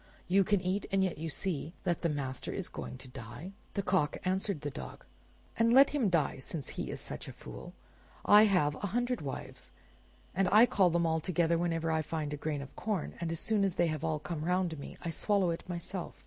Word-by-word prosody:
You 195 Hz, +2 st, +4 dB
can 205 Hz, 0 st, +2 dB
eat, 185 Hz, +2 st, -1 dB
and 195 Hz, 0 st, +3 dB
yet 185 Hz, -5 st, -1 dB
you 165 Hz, +1 st, -3 dB
see 165 Hz, +1 st, -2 dB
that 175 Hz, -3 st, 0 dB
the 170 Hz, -, +1 dB
master 135 Hz, -3 st, -3 dB
is -, -, -3 dB
going -, -, -6 dB
to 130 Hz, -, -11 dB
die!" 130 Hz, +8 st, -8 dB, 0.2 s
The 200 Hz, -, 0 dB
Cock 180 Hz, -6 st, +1 dB
answered 190 Hz, -3 st, 0 dB
the 145 Hz, -1 st, -3 dB
Dog, 65 Hz, -, -8 dB, 0.5 s
"And 230 Hz, 0 st, +4 dB
let 270 Hz, +2 st, +8 dB
him 265 Hz, -8 st, +2 dB
die 160 Hz, -6 st, +1 dB
since 140 Hz, +1 st, -3 dB
he -, -, -4 dB
is -, -, -4 dB
such -, -, -6 dB
a -, -, -6 dB
fool. 60 Hz, 0 st, -10 dB, 0.5 s
I 210 Hz, +1 st, +8 dB
have 180 Hz, -8 st, +3 dB
a 200 Hz, -, -3 dB
hundred 245 Hz, 0 st, 0 dB
wives, 135 Hz, -3 st, -6 dB, 0.6 s
and 190 Hz, +1 st, +2 dB
I 215 Hz, +3 st, +8 dB
call 195 Hz, -6 st, +3 dB
them 170 Hz, 0 st, +1 dB
all 160 Hz, 0 st, +2 dB
together 170 Hz, 0 st, +1 dB
whenever 165 Hz, -1 st, 0 dB
I 160 Hz, 0 st, +2 dB
find 155 Hz, -1 st, -3 dB
a -, -, -1 dB
grain 145 Hz, -1 st, -2 dB
of 135 Hz, -, -13 dB
corn, 210 Hz, -7 st, -2 dB
and 165 Hz, -1 st, -1 dB
as 165 Hz, -, -2 dB
soon 215 Hz, -2 st, +2 dB
as 195 Hz, -3 st, +1 dB
they 170 Hz, -1 st, +2 dB
have 155 Hz, -, -7 dB, 0.2 s
come 160 Hz, -3 st, -4 dB
round 180 Hz, -2 st, 0 dB
me, 140 Hz, -, -8 dB
I 170 Hz, -, -2 dB
swallow 195 Hz, 0 st, +2 dB
it 165 Hz, +2 st, -6 dB
myself. 175 Hz, +1 st, -3 dB
170 Hz, 220 wpm, -32 LUFS, 150-195 Hz, 0.6 s, let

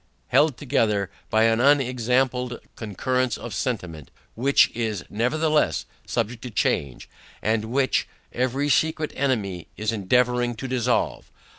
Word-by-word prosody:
Held 140 Hz, +1 st, +3 dB
together 110 Hz, -, 0 dB, 0.2 s
by 110 Hz, +1 st, +3 dB
an 115 Hz, 0 st, +3 dB
unexampled 125 Hz, -2 st, +2 dB, 0.2 s
concurrence 125 Hz, +2 st, -1 dB
of 120 Hz, -, -7 dB
sentiment, 90 Hz, -, -3 dB, 0.2 s
which, 135 Hz, +5 st, +4 dB
is 110 Hz, -5 st, -3 dB
nevertheless 155 Hz, +8 st, +1 dB, 0.2 s
subject 115 Hz, 0 st, -2 dB
to 125 Hz, -, -6 dB
change, 70 Hz, -, -1 dB, 0.3 s
and 110 Hz, 0 st, 0 dB
which, 130 Hz, +4 st, +1 dB, 0.3 s
every 130 Hz, +3 st, 0 dB
secret 155 Hz, +1 st, +1 dB
enemy 105 Hz, -10 st, -1 dB
is 105 Hz, +1 st, -1 dB
endeavouring 120 Hz, +3 st, +1 dB
to 135 Hz, +4 st, -5 dB
dissolve. 125 Hz, -1 st, 0 dB
120 Hz, 120 wpm, -24 LUFS, 110-130 Hz, 0.3 s, which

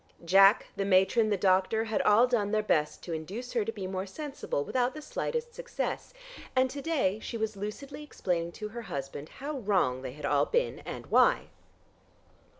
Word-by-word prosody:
Jack, 195 Hz, +4 st, +6 dB
the 195 Hz, -, -1 dB
matron, 195 Hz, +4 st, +3 dB
the 205 Hz, -, +1 dB
doctor, 190 Hz, +3 st, +2 dB
had 220 Hz, -1 st, 0 dB
all 210 Hz, +4 st, +6 dB
done 235 Hz, -5 st, 0 dB
their 215 Hz, 0 st, +1 dB
best 150 Hz, -7 st, 0 dB
to 170 Hz, -, -5 dB
induce 200 Hz, +11 st, -5 dB
her 235 Hz, -3 st, +2 dB
to 225 Hz, -, -3 dB
be 205 Hz, -4 st, -6 dB
more 190 Hz, +1 st, -3 dB
sensible 275 Hz, -, -4 dB
without 250 Hz, -, 0 dB
the 305 Hz, -, -6 dB
slightest 475 Hz, +8 st, -3 dB
success, -, -, -4 dB, 0.4 s
and 260 Hz, 0 st, +3 dB
to 280 Hz, -, -5 dB
day 270 Hz, -, 0 dB
she 230 Hz, -, -5 dB
was 220 Hz, -1 st, -2 dB
lucidly 210 Hz, +9 st, -6 dB
explaining 175 Hz, -, -2 dB
to 210 Hz, -1 st, -6 dB
her 235 Hz, +2 st, -6 dB
husband 140 Hz, -5 st, -6 dB
how 280 Hz, +1 st, -5 dB
wrong 190 Hz, -, +1 dB
they 130 Hz, -1 st, -6 dB
had 150 Hz, -, -7 dB
all 145 Hz, -1 st, +2 dB
been 485 Hz, +1 st, 0 dB
and -, -, -6 dB
why. -, -, +4 dB
210 Hz, 185 wpm, -29 LUFS, 185-255 Hz, 0.4 s, Jack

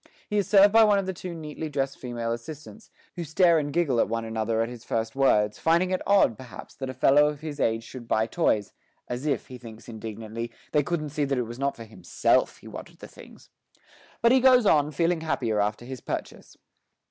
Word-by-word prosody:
He 210 Hz, -1 st, 0 dB
is 200 Hz, -, -2 dB
served 200 Hz, 0 st, +6 dB
by 225 Hz, 0 st, +7 dB
one 210 Hz, -2 st, +4 dB
of 190 Hz, -1 st, -2 dB
two 180 Hz, 0 st, -7 dB
neatly 155 Hz, 0 st, -6 dB
dressed 135 Hz, -1 st, -2 dB
female 120 Hz, -2 st, -4 dB
assistants, 150 Hz, -, -8 dB, 0.3 s
who 175 Hz, -, -4 dB
stare 165 Hz, +1 st, +3 dB
and 145 Hz, -1 st, -3 dB
giggle 145 Hz, -7 st, +1 dB
at -, -, +2 dB
one 115 Hz, 0 st, -2 dB
another 110 Hz, 0 st, -1 dB
at -, -, -3 dB
his 120 Hz, -1 st, -10 dB
first 115 Hz, 0 st, -3 dB
words, 105 Hz, -6 st, +2 dB
finding 170 Hz, +3 st, +2 dB
it 185 Hz, -, 0 dB
odd, 200 Hz, -, +3 dB
perhaps, 130 Hz, -2 st, -11 dB
that 135 Hz, -1 st, -6 dB
a -, -, -4 dB
fellow 145 Hz, +3 st, +5 dB
of 150 Hz, -1 st, -4 dB
his 150 Hz, -2 st, -6 dB
age 115 Hz, 0 st, 0 dB
should 120 Hz, 0 st, -10 dB
buy 110 Hz, -1 st, +2 dB
toys 105 Hz, -2 st, 0 dB, 0.3 s
as 125 Hz, +5 st, -4 dB
if, 140 Hz, -5 st, -1 dB
he 125 Hz, -1 st, -10 dB
thinks 115 Hz, -2 st, -12 dB
indignantly, 110 Hz, +1 st, -6 dB, 0.2 s
they 150 Hz, -, +3 dB
couldn't 155 Hz, 0 st, -3 dB
see 150 Hz, +1 st, -2 dB
that 135 Hz, -1 st, -1 dB
it 125 Hz, -, +1 dB
was 120 Hz, +2 st, -9 dB
not 140 Hz, 0 st, -1 dB
for 115 Hz, -, -9 dB
himself 100 Hz, -6 st, 0 dB
he -, -, -15 dB
wanted -, -, -10 dB
the -, -, -11 dB
things. -, -, -16 dB, 0.7 s
But 235 Hz, -, +6 dB
he 260 Hz, -, +6 dB
goes 250 Hz, -2 st, +5 dB
on, 150 Hz, -6 st, +4 dB
feeling 165 Hz, +2 st, 0 dB
happier 120 Hz, -9 st, -1 dB
after 105 Hz, +3 st, -1 dB
his 130 Hz, -1 st, -8 dB
purchase. -, -, -6 dB
135 Hz, 220 wpm, -26 LUFS, 115-165 Hz, 0.7 s, by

